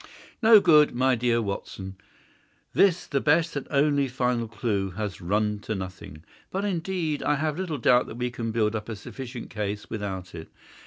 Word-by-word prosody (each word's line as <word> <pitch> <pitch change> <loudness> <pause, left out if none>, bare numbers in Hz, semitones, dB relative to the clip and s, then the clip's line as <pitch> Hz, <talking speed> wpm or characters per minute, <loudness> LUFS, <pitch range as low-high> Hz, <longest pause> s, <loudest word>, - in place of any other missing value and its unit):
"No 220 -1 +8
good, 150 -8 +5
my 130 +1 +3
dear 120 -1 +1
Watson. 95 -1 -5 0.8
This, 185 -3 +3
the 140 -2 -1
best 160 +2 +2
and 145 - -4
only 140 -1 +2
final 125 -2 -1
clue, 105 -3 -1
has 105 -2 -4
run 105 +3 0
to 110 +1 -4
nothing. 95 -5 -8 0.3
But, 195 +2 -2
indeed, 175 -4 -2
I 150 - +2
have 150 +2 -2
little 175 -6 -2
doubt 125 0 +4
that 110 - -8
we 125 0 -2
can 115 -1 -3
build 110 -1 +1
up 105 +1 -5
a 110 - -3
sufficient 120 +4 -8
case 105 -1 -4
without 95 -4 -5
it. 80 -1 -9
120 Hz, 175 wpm, -26 LUFS, 105-150 Hz, 0.8 s, No